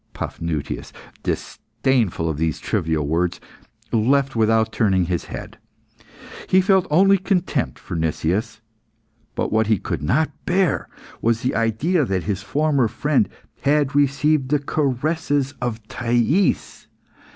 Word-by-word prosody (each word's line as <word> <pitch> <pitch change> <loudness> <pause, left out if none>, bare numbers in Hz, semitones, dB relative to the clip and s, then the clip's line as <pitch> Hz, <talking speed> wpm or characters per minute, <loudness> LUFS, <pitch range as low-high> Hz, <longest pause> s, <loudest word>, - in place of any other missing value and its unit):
Paphnutius, 80 -3 -4 0.3
disdainful 115 -11 -1
of 80 -3 -2
these 80 -2 0
trivial 80 -2 -1
words, 85 +3 0 0.5
left 135 +4 +2
without 110 0 +2
turning 95 -5 +2
his 85 -1 -2
head. - - -8 0.9
He 185 - +5
felt 190 -1 +3
only 195 +5 +5
contempt 180 - -1
for 90 - -7
Nicias; 85 +8 -1 0.7
but - - -1
what 110 0 +2
he 110 -1 +3
could - - -4
not 140 - +1 0.2
bear 180 -4 +1 0.3
was 115 0 +1
the 125 - 0
idea 125 - +1
that 95 -7 -1
his 100 0 -2
former 140 +2 +1
friend 120 -2 +1 0.3
had 145 -1 +2
received 140 0 +2
the 150 - +3
caresses 145 0 0
of 115 -3 -3
Thais. 120 - 0
120 Hz, 125 wpm, -22 LUFS, 100-150 Hz, 0.9 s, He